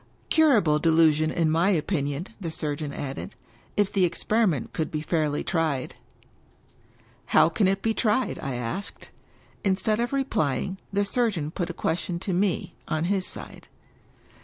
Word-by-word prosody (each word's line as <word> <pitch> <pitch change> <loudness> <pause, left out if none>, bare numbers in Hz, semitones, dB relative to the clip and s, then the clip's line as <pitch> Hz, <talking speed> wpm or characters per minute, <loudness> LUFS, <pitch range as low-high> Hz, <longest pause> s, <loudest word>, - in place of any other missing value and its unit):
" - - -35
Curable 220 - +4
delusion, 160 -1 +4
in 160 -1 +1
my 170 +4 +3
opinion," 150 -4 0 0.2
the 170 - -3
surgeon 150 -2 -3
added, 140 +7 -6 0.2
" - - -31
if 205 -2 +2
the 195 - +3
ex 175 -1 0
periment 205 - +1
could 160 - -2
be 155 - -3
fairly 155 -2 0
tried." 155 -6 -1 1.3
"How - - +5
can 190 +4 +2
it 195 +1 0
be 225 - +2
tried?" 220 +3 +1
I 135 -2 -3
asked. 120 +12 -5 0.5
Instead 210 +2 +1
of 240 +1 0
replying, 195 - -1
the 200 +1 +1
surgeon 200 -9 0
put 175 0 -3
a - - -3
question 170 +2 -2
to 185 +2 -3
me, 185 0 0
on 155 0 -1
his 190 -2 0
side. - - -7
170 Hz, 160 wpm, -26 LUFS, 155-200 Hz, 1.3 s, How